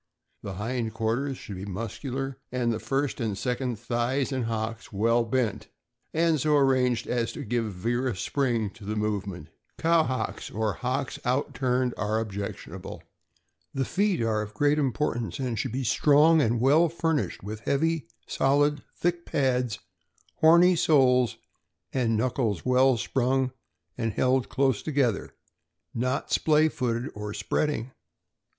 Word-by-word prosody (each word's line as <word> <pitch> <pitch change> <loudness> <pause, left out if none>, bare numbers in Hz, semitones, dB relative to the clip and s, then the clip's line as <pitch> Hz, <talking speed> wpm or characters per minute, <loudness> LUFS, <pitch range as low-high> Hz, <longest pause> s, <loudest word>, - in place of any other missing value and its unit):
The 100 - -6
hind 110 +3 -3
quarters 120 +5 -1
should 100 - -8
be 95 - -6
muscular, 120 +6 -4
and 120 -2 0
the 110 - -3
first 135 +1 -1
and 105 -4 -1
second 125 +1 -2
thighs 120 +4 -1
and 130 -3 -1
hocks 115 0 -4
well 115 +4 +2
bent, 115 -2 -1 0.4
and 165 -1 +2
so 150 +2 +3
arranged 130 -3 +2
as 120 -2 -1
to - - -6
give 115 -2 -1
vigorous 120 +3 -1
spring 120 -6 0
to 100 - -15
the 105 +2 -3
movement. 100 -6 -3 0.3
Cow 165 0 +4
hocks, 130 -5 -3
or 110 -1 -1
hocks 130 +5 -3
out 130 +3 0
turned, 125 -1 0
are 105 +1 0
objectionable. 100 -2 -6 0.7
The 135 -1 0
feet 195 - +1
are 110 -1 +1
of 105 0 -7
great 145 +4 +3
importance, 130 -4 -1
and 125 -5 -2
should 130 - -2
be 130 +3 -2
strong 150 +6 +5
and 115 -3 +1
well 150 +7 +4
fur 165 0 0
nished 145 - -2
with 105 +2 -5
heavy, 160 +6 0 0.2
solid, 145 +1 +2
thick 175 0 -1
pads, 125 -6 0 0.6
horny 170 +3 +6
soles, 125 - +3 0.6
and 115 -4 +1
knuckles 115 -4 -1
well 130 0 +4
sprung 130 +3 0 0.5
and 115 -2 -1
held 130 +2 +1
close 135 -5 +1
together, 135 -8 0 0.6
not 130 +3 -1
splay, 155 0 +4
footed 125 -4 -2
or 105 0 -6
spreading. 145 -5 -1
125 Hz, 145 wpm, -27 LUFS, 115-140 Hz, 0.7 s, horny